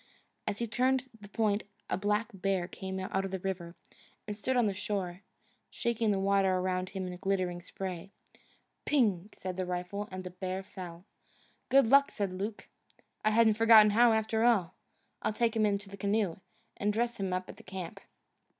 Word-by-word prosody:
As 205 -1 -1
he 235 - -1
turned 255 +3 +1
the 200 - -10
point 210 -1 +1 0.3
a - - 0
black 210 +3 0
bear 195 -2 0
came 190 0 -5
out 190 +1 -1
of 195 - -3
the 190 - -2
river, 180 -2 -4 0.5
and 210 - -3
stood 250 +5 -1
on 240 - +4
the 205 - +1
shore, 190 -2 -3 0.5
shaking 235 -2 0
the 200 -2 +2
water 195 -1 +3
around 185 0 -1
him 190 -1 -4
in 180 0 -5
glittering 185 -2 -1
spray. 185 0 -6 0.7
Ping! 210 -9 +2
said 185 -1 -5
the 185 - -1
rifle, 180 +4 -3
and 185 0 -5
the 180 - -7
bear 185 +1 -4
fell. 180 -3 -9 0.6
"Good 275 0 +6
luck!" 280 +4 +6
said 200 -3 -2
Luke. 205 +3 -5 0.6
"I 215 - +4
haven't 220 -1 +4
forgotten 220 -2 +8
how, 235 +2 +6
after 220 0 +1
all. 200 -7 +3 0.5
I'll - - 0
take 230 +1 +1
him 215 -1 +3
into 200 0 -1
the 200 0 -9
canoe, 200 -3 0 0.4
and 205 +1 +1
dress 235 +3 -1
him 195 -1 -1
up 185 0 -2
at - - -10
the - - -14
camp." 185 -2 -7
200 Hz, 185 wpm, -31 LUFS, 185-220 Hz, 0.7 s, forgotten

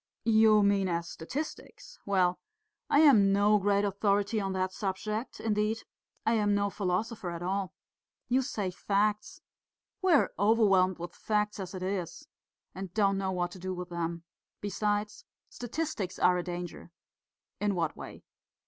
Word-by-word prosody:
"You 220 -2 +5
mean 200 -1 +3
as 170 0 -2
statistics. 305 - -7
Well, 180 -2 +2 0.5
I 285 - +5
am 220 -11 +6
no 205 +1 +4
great 200 +1 +2
authority 200 +2 +1
on 195 -1 -2
that 185 0 -1
subject, 210 +4 -3
indeed 215 0 0 0.4
I 225 - +3
am 205 -2 +2
no 200 0 0
philosopher 200 +1 -2
at 170 0 -5
all. 190 +1 -2 0.5
You 255 +2 +3
say 210 -8 -3
'facts' 205 +3 -1 0.6
we 375 -2 +3
are 290 - +3
overwhelmed 200 -4 +4
with 175 0 -7
facts 210 0 -1
as 190 -1 -6
it 185 - -5
is, 190 - -4 0.5
and 190 -2 -7
don't 200 -2 +2
know 190 -1 -1
what 175 -1 -1
to 185 - -10
do 185 +1 -4
with 180 0 -6
them. 170 -1 -3 0.4
Besides, 205 - -2 0.3
statistics 240 - -4
are 180 - +4
a 180 - 0
danger." 175 -1 -6 0.7
"In 205 -1 0
what 165 -3 -1
way?" - - -10
200 Hz, 150 wpm, -30 LUFS, 185-215 Hz, 0.7 s, am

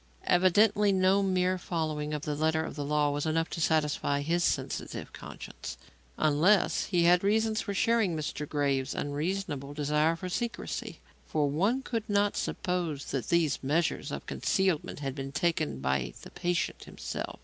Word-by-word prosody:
Evidently 205 +3 +4
no 190 +1 +4
mere 185 -1 +1
following 155 -4 -2
of 150 -1 -3
the 150 - -2
letter 160 +2 +1
of - - -6
the 145 - -3
law 150 0 +2
was 145 +2 -2
enough 165 +1 0
to 165 - -3
satisfy 150 -2 +1
his 170 +4 +1
sensitive - - -2
conscience. - - -8 0.4
Unless 160 +7 +3
he 175 -2 +2
had 175 +1 +5
reasons 220 +2 +2
for 200 - -4
sharing 220 -6 +2
Mr. 150 -1 -4
Graves's 140 -2 0
unreasonable 145 -1 -3
desire 150 +2 +2
for 185 +2 -6
secrecy 235 +6 -4 0.3
for 150 -2 +1
one 200 - +1
could 230 -4 -3
not 205 0 +2
suppose 175 -6 -2
that 135 -3 -2
these 165 -4 +2
measures 150 +2 0
of - - -5
concealment 185 -6 0
had 135 -2 -2
been 135 0 -5
taken 160 - 0
by 65 -2 -1
the - - -11
patient 175 -1 -2
himself. - - -6
160 Hz, 160 wpm, -29 LUFS, 145-185 Hz, 0.4 s, had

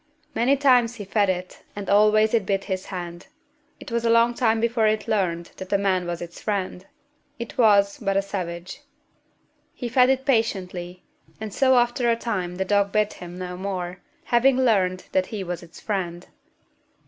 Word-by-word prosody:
Many 260 +5 +2
times 250 -4 +4
he 210 -4 -7
fed 200 0 +1
it, 180 0 -4
and 205 -1 -6
always 215 +2 +4
it 230 -3 +3
bit 195 0 -1
his 190 -2 -4
hand. 175 -2 -7 0.5
It - - -10
was 235 0 0
a 230 - +2
long 230 +1 +4
time 225 -2 +1
before 230 -1 +2
it 215 0 0
learned 175 -5 -1
that 190 - -8
the 200 - +3
man 190 -3 0
was 175 0 -4
its 170 0 -10
friend. 190 -3 -3 0.5
It 235 -1 -7
was 200 -3 +4
but 195 -3 0
a 195 - +2
savage. 180 -3 -5 0.9
He 245 - -4
fed 255 +1 +4
it 265 0 +1
patiently, 185 -8 -1 0.4
and 215 -2 -6
so 260 -1 +4
after 240 0 +2
a 230 - +3
time 190 -7 -3
the 190 +1 -2
dog 200 0 +2
bit 215 0 +1
him 175 0 -8
no 180 -1 -5
more, 185 -1 -4 0.2
having 250 +2 +3
learned 195 -8 +2
that 185 -1 +1
he 210 -3 -5
was 175 -1 -5
its 170 -1 -14
friend. 180 -4 -3
200 Hz, 185 wpm, -24 LUFS, 185-230 Hz, 0.9 s, times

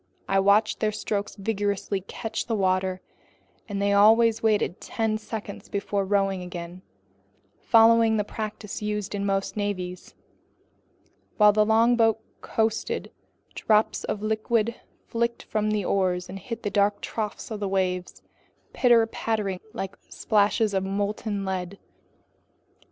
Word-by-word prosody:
I 195 - +2
watched 200 +2 +3
their 215 - +1
strokes 210 -1 -3
vigorously 200 -1 -2
catch 220 +3 -5
the 230 - 0
water, 185 -1 0 0.7
and 200 -1 -3
they 200 0 +2
always 225 +2 +5
waited 210 -4 +1
ten 220 -1 -1
seconds 215 -2 -7
before 200 0 -1
rowing 195 -1 +1
again, 175 0 -7 0.8
following 225 -1 +5
the 210 - +1
practice 210 0 -6
used 210 -1 -3
in 200 0 -2
most 195 0 -1
navies. 185 -4 -4 1.2
While 210 -1 +6
the 210 0 +4
longboat 225 0 +4 0.2
coasted, 220 0 -1 0.4
drops 215 0 +1
of 210 - -3
liquid 220 +1 0 0.3
flicked 235 0 -1
from 215 0 -1
the 210 -3 0
oars 180 -2 0
and 195 +1 -7
hit 230 +4 -7
the 205 - -2
dark 205 0 +2
troughs 215 0 -4
of 215 - -4
the 200 -2 -2
waves, 185 -2 -2 0.5
pitter 235 -3 +5
pattering 215 -4 -2
like 200 -4 -5
splashes 210 0 +1
of 190 -1 +1
molten 200 +1 -2
lead. 190 0 -3
205 Hz, 130 wpm, -26 LUFS, 195-220 Hz, 1.2 s, While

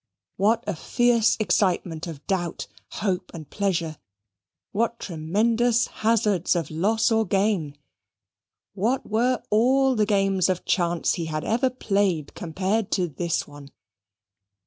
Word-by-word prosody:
What 220 +4 +2
a 205 - -2
fierce 235 +6 +2
excitement 180 -4 0
of 155 -4 -9
doubt, 175 -4 -2 0.3
hope, 185 -3 -2
and 155 -3 -8
pleasure! 170 -6 -2 0.7
What 230 +2 -1
tremendous 220 +8 +1 0.2
hazards 210 -6 +2
of 165 -3 -2
loss 215 +9 +1
or 225 0 +3
gain! 190 -7 0 1.0
What 225 +7 0
were 240 +3 0
all 260 +5 +4
the 210 -2 +2
games 195 -3 +2
of 185 -1 -1
chance 175 -2 +1
he 170 - -3
had 155 -1 -3
ever 245 +4 +1
played 195 - -1
compared 190 +5 -2
to 180 -3 +1
this 165 +3 -2
one? 145 -1 -12
195 Hz, 125 wpm, -24 LUFS, 170-225 Hz, 1.0 s, all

